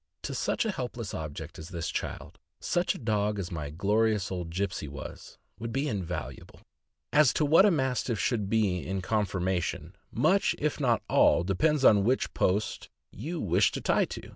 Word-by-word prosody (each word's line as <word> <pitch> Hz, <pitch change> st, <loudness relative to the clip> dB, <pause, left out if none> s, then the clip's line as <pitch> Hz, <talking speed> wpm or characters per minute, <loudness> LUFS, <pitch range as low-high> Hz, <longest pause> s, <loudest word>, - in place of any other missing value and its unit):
To -, -, -4 dB
such -, -, 0 dB
a 220 Hz, -, +1 dB
helpless 125 Hz, -, -5 dB
object 75 Hz, -2 st, -6 dB
as 80 Hz, +2 st, -8 dB
this 85 Hz, -3 st, -4 dB
child, -, -, -5 dB, 0.2 s
such 175 Hz, +1 st, 0 dB
a -, -, -6 dB
dog 105 Hz, -3 st, 0 dB
as 95 Hz, -1 st, -4 dB
my 75 Hz, -4 st, -4 dB
glorious 105 Hz, +5 st, +1 dB
old 90 Hz, -3 st, -4 dB
Gipsey 95 Hz, -3 st, -3 dB
was 70 Hz, -1 st, -9 dB, 0.2 s
would 115 Hz, 0 st, -4 dB
be 135 Hz, +5 st, -1 dB
invaluable 100 Hz, -, -5 dB, 0.5 s
As 150 Hz, -4 st, +6 dB
to 155 Hz, -, +1 dB
what 165 Hz, +7 st, +6 dB
a -, -, +5 dB
Mastiff 130 Hz, -, 0 dB
should 105 Hz, 0 st, 0 dB
be 105 Hz, -5 st, +2 dB
in 95 Hz, +1 st, -3 dB
conformation, 95 Hz, -4 st, -1 dB, 0.2 s
much, 160 Hz, -, +2 dB
if 150 Hz, 0 st, -1 dB
not 120 Hz, -6 st, +2 dB
all, 85 Hz, -, +4 dB
depends 135 Hz, -, +1 dB
on 100 Hz, -2 st, +6 dB
which 125 Hz, +5 st, +1 dB
post 100 Hz, +4 st, 0 dB, 0.2 s
you 160 Hz, -, -5 dB
wish 95 Hz, -, +2 dB
to -, -, -3 dB
tie -, -, +2 dB
to. -, -, -8 dB
105 Hz, 175 wpm, -28 LUFS, 90-130 Hz, 0.5 s, As